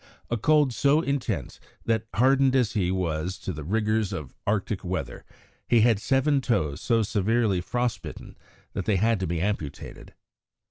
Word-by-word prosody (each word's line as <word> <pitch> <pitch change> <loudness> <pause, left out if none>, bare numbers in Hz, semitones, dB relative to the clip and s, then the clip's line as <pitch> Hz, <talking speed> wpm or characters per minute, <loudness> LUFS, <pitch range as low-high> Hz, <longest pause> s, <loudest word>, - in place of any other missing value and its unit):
a - - +2
cold 145 +2 +3
so 140 +5 +3
intense 125 - -3 0.3
that, 110 -1 0
hardened 135 +2 +4
as 125 -5 +2
he 95 -5 +1
was 90 -1 -2
to 95 - -5
the 75 -1 -7
rigours 110 +3 0
of 75 -4 -6
Arctic 100 -1 -1
weather, 95 0 -4 0.5
he 120 -2 +5
had 115 -2 +4
seven 135 +5 +2
toes 90 - -1
so 115 -2 +2
severely 105 -2 +1
frost 120 +5 -2
bitten - - -9 0.4
that - - -3
they 105 - +2
had 110 +2 +2
to 95 - -2
be 85 0 -2
amputated. 90 -6 -4
110 Hz, 160 wpm, -26 LUFS, 95-125 Hz, 0.5 s, he